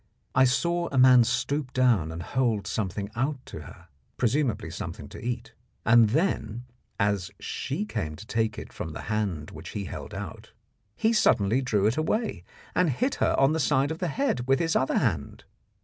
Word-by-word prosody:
I 130 +1 +5
saw 170 +7 +1
a 135 - -1
man 130 -1 +8
stoop 130 +3 -1
down 115 -11 +3
and 85 +1 -6
hold 115 -2 0
something 100 0 -3
out 135 +5 0
to - - -8
her 85 +3 -12 0.3
presumably 125 +1 0
something - - -6
to - - -10
eat 120 0 -4 0.3
and 115 -1 +6
then, 120 - 0 0.3
as 100 -2 +1
she 105 - -3
came 105 -8 -3
to 95 +8 -11
take 110 -1 -1
it - - -8
from 80 - -5
the - - -6
hand 95 -8 -2
which 80 +2 -9
he 100 - -3
held - - -7
out, - - -8 0.4
he 225 +1 +2
suddenly 125 - +3
drew 105 -6 +1
it 110 +6 +2
away 215 +9 -1 0.3
and 180 -2 +3
hit 255 - 0
her - - +3
on 135 +3 +4
the 160 - 0
side 145 -1 +2
of 160 - -5
the 180 - -1
head 145 - -1
with 135 0 +4
his 165 +1 0
other 130 - +2
hand. 80 - -1
120 Hz, 185 wpm, -27 LUFS, 105-140 Hz, 0.4 s, man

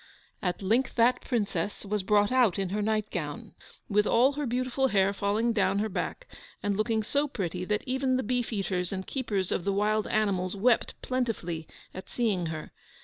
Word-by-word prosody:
At 180 +1 -2
length 235 +7 +1
that 240 +1 +4
Princess 205 -5 -2
was 210 +1 -1
brought 205 +2 +3
out 245 -8 +4
in 195 -2 -1
her 210 +3 -1
nightgown, 205 -8 -2 0.3
with 210 +1 +2
all 255 +4 +5
her 290 -1 -2
beautiful 255 +2 +1
hair 195 -4 +3
falling 210 +4 +1
down 195 -2 +2
her 215 +2 0
back, - - -3 0.4
and 205 -1 +1
looking 220 +1 +1
so 285 +7 0
pretty 180 - -3
that 210 +2 0
even 260 0 +1
the 260 - -1
beef 245 +1 -1
eaters 190 -4 -1
and 190 -1 -4
keepers 205 -9 -2
of - - 0
the 200 - +1
wild 210 +2 +1
animals 195 -3 0
wept 230 +4 +2
plentifully 215 -11 -2 0.3
at 185 0 -9
seeing 205 -8 0
her. 155 -1 -6
210 Hz, 180 wpm, -28 LUFS, 190-240 Hz, 0.4 s, all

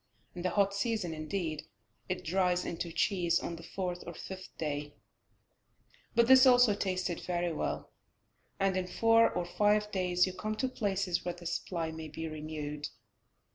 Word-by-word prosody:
In 175 - -6
the 185 - +1
hot 200 0 +2
season, 200 -4 -1
indeed, 155 -1 -3 0.4
it 185 - -2
dries 180 +1 +1
into 170 0 -4
cheese 170 0 +2
on 170 - -4
the 165 - -10
fourth 180 +1 -4
or 170 - -6
fifth 190 +2 -8
day, 145 -1 -3 1.2
but 235 0 +6
this 260 +2 +8
also 245 -3 +7
tastes 185 -2 -1 0.2
very 175 -1 0
well, - - -3 0.7
and 195 -1 +2
in 185 -1 -1
four 225 +4 +5
or 175 - -2
five 210 +3 +2
days 180 -2 +2
you 185 - -4
come 215 +3 -3
to 260 - 0
places 195 -7 -1
where 175 -1 -3
the 175 0 -12
supply 170 -1 -2
may 160 0 -7
be 160 +2 -5
renewed. 150 -1 -5
180 Hz, 165 wpm, -32 LUFS, 165-200 Hz, 1.2 s, this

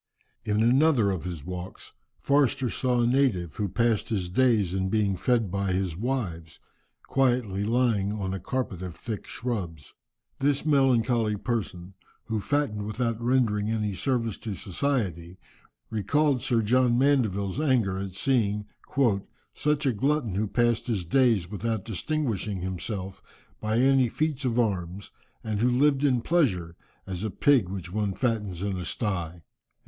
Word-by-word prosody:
In 105 +1 +1
another 125 -3 +4
of 90 -3 -4
his 85 -5 -6
walks 90 0 -7 0.3
Forster 140 -3 +2
saw 125 -2 +1
a - - +3
native, 120 - +1
who 105 -2 -1
passed 115 +1 +1
his 95 -5 -2
days 110 -5 +3
in 95 0 -1
being 105 -2 +1
fed 115 0 +1
by 100 -1 -1
his 90 -3 -1
wives, 90 -8 -3 0.5
quietly 120 -7 +1
lying 110 -3 +1
upon 95 -3 -3
a 95 - -3
carpet 100 -2 -3
of 90 -3 -6
thick 110 -4 -6
shrubs. 90 - -5 0.5
This 140 +1 +1
melancholy 125 -6 +3
person, 100 -5 -4 0.3
who 110 -2 -2
fattened 105 -4 -1
without 115 +1 -2
rendering 115 -4 +1
any 105 -2 -1
service 115 0 -1
to 105 -3 -5
society, 95 - -2 0.5
recalled 135 +6 +1
Sir 120 -4 +1
John 120 +2 +3
Mandeville's 115 -7 +1
anger 120 -11 +1
at 95 -1 -5
seeing 105 -2 0 0.9
"such 150 0 0
a 130 - +2
glutton 135 -1 0
who 105 +3 0
passed 120 +2 +1
his 105 -7 -1
days 115 -2 +3
without 110 +1 -3
distinguishing 110 - -2
himself 95 +1 -4 0.4
by 110 +1 -1
any 130 0 +4
feats 150 0 -1
of 120 -1 +1
arms, 95 -4 -2 0.3
and 110 -2 -2
who 120 +3 +3
lived 140 +2 +3
in 130 -4 +3
pleasure, 95 - +1 0.3
as 95 0 -5
a 110 - -1
pig 120 0 +3
which 95 -2 -6
one 105 -2 0
fattens 105 -7 -1
in 100 -2 -2
a 90 - -5
sty." 85 -6 -3
110 Hz, 150 wpm, -27 LUFS, 95-125 Hz, 0.9 s, another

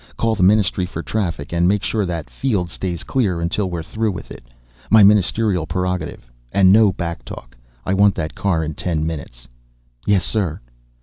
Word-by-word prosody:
Call 115 -1 +1
the 105 - -2
Ministry 95 -1 +3
for 85 -2 -6
Traffic 85 -3 -3
and 85 +1 +2
make 100 +1 +1
sure 105 -4 -1
that 85 -3 -4
field 100 -10 -2
stays 90 -2 -4
clear 100 -10 0
until 90 +4 -1
we're 85 -2 -4
through 110 +5 -1
with 90 - -8
it. - - -10 0.5
My 110 -1 +7
Ministerial 100 -3 +3
prerogative, 90 -5 -3 0.2
and 95 +2 +5
no 105 0 +6
back 85 -2 -5
talk. - - -10 0.3
I 95 - 0
want 100 0 +4
that 80 -1 -3
car 85 -5 0
in 80 0 -4
ten 80 -1 -2
minutes." 65 -6 -6 0.6
"Yes, 100 -3 +3
sir." 95 -8 -1
90 Hz, 180 wpm, -20 LUFS, 85-100 Hz, 0.6 s, My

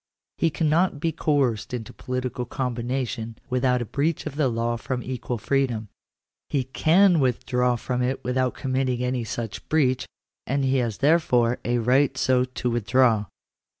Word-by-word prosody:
He 165 - +3
cannot 160 +1 +1
be 165 +2 0
coerced 135 -8 0
into 115 -3 -7
political 125 -1 -3
combination 120 -2 -3
without 125 -1 +2
a - - -8
breach 145 +7 -1
of 150 -3 -5
the 150 -2 +2
law 115 0 -1
of 125 +1 -3
equal 125 -1 -4
freedom; 120 -3 -1 0.6
he 135 -3 0
can 170 +7 +4
withdraw 125 -1 +1
from 125 +1 -2
it 130 +2 -1
without 125 0 0
committing 130 -2 -1
any 125 -1 -1
such 115 -1 -5
breach; 130 -5 +2 0.4
and 140 +1 0
he 135 0 +2
has 115 -5 -1
therefore 125 -7 +3
a 120 0 0
right 125 +4 +2
so 125 -1 +3
to 125 -1 -3
withdraw. 115 -1 +3
125 Hz, 150 wpm, -25 LUFS, 120-135 Hz, 0.6 s, can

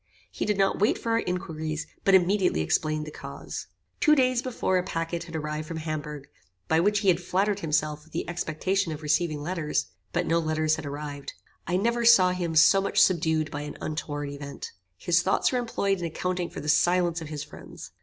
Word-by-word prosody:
He - - -3
did 210 -1 0
not 195 -1 +2
wait 210 - +3
for 230 - -3
our 230 - +3
inquiries, 160 -5 -3 0.2
but 195 - +5
immediately 185 - +3
explained 155 - 0
the 150 - -8
cause. - - -7 0.3
Two 305 -1 +5
days 255 -3 +3
before 230 -7 0
a - - -2
packet 170 -1 -3
had 165 -1 -9
arrived 150 0 -3
from 165 - -5
Hamburgh, 150 -2 -5 0.4
by 160 - +3
which 205 +4 +2
he 200 - +3
had 175 -1 +3
flattered 195 +3 0
himself 150 -2 -1
with 160 - -22
the 165 - -3
expectation 175 +2 -1
of 155 0 -6
receiving 150 0 0
letters, 165 - -1 0.2
but - - 0
no 165 +1 +2
letters 155 -1 +1
had 155 -2 -6
arrived. 145 0 -6 0.3
I 175 +2 +1
never 235 +4 +1
saw 200 -6 +7
him 175 -3 -2
so 195 +5 +6
much 195 - 0
subdued 160 -4 +3
by 145 - -4
an 150 0 -7
untoward 145 -2 -4
event. 140 0 -7 0.3
His 170 - +2
thoughts 190 - +2
were 250 - +1
employed 200 -5 -1
in 175 - -3
accounting 180 +2 -2
for - - -7
the 150 - -7
silence 175 +2 +3
of 155 - -7
his 150 -2 -4
friends. - - -11
165 Hz, 205 wpm, -27 LUFS, 155-190 Hz, 0.4 s, saw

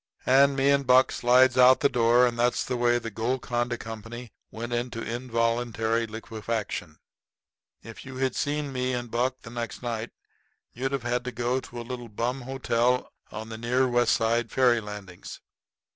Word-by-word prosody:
And 140 +2 +5
me 135 +1 +3
and 140 -2 +1
Buck 130 +1 +5
slides 125 +1 +4
out 125 +1 +7
the - - +5
door; 120 -1 +4
and 120 -1 -2
that's 120 +1 +1
the 125 - -2
way 120 0 +2
the 115 -1 -5
Golconda 120 +1 -2
Company 115 +1 -8 0.2
went 120 +2 -6
into 120 -1 -2
involuntary 115 -1 -1
liquefaction. 110 -6 -5 0.9
If - - -10
you 130 0 -9
had 130 0 0
seen 145 -1 -2
me 125 0 -1
and 120 -2 -5
Buck 130 +2 -1
the 115 - -10
next 120 +1 -5
night 115 -1 -3 0.6
you'd 130 +3 -3
have 135 -3 -2
had 120 +1 -1
to 125 - -3
go 120 +2 -1
to 120 -2 -9
a - - -5
little 120 -1 -7
bum 120 +5 -2
hotel 125 -1 0 0.2
over 110 +1 -7
near 120 +3 0
the 130 - +3
West 120 0 +3
Side 115 +1 0
ferry 125 -3 +3
landings. 105 -4 -9
120 Hz, 175 wpm, -26 LUFS, 115-130 Hz, 0.9 s, out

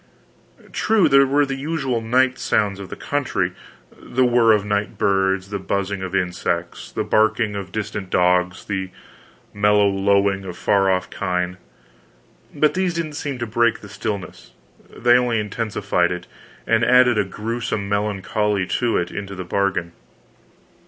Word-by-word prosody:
True, 220 -4 +3
there 140 0 +5
were 145 +2 +3
the 135 - -4
usual 135 -4 -2
night 130 +3 +2
sounds 100 -2 0
of 100 - -8
the - - -6
country 130 -11 -1 0.4
the 130 +1 0
whir 120 -2 +4
of 105 -2 +2
night 105 0 -2
birds, 95 0 +1
the 100 - -2
buzzing 100 0 -2
of 95 0 -4
insects, 90 -2 -2
the - - -2
barking 110 0 +2
of 100 -2 -6
distant 105 -2 -4
dogs, 90 0 +1
the 95 -2 -3 0.6
mellow 105 0 +3
lowing 100 0 +2
of 90 -2 -7
far 100 -1 +2
off 95 -1 0
kine 90 -1 -2 0.9
but 150 +1 +2
these 185 -2 0
didn't 165 -3 -3
seem 145 -2 -4
to 120 - -3
break 120 0 +1
the 100 - -11
stillness, 100 -2 -6 0.4
they 120 +1 +3
only 120 -2 0
intensified 105 -4 -1
it, 90 0 -5 0.4
and 115 0 +2
added 125 -2 +5
a - - +3
grewsome 110 +1 -4
melancholy 100 0 0
to 120 +5 0
it 90 0 -2
into 100 -1 -6
the 95 -1 -6
bargain. 90 -2 -1
105 Hz, 150 wpm, -21 LUFS, 95-120 Hz, 0.9 s, there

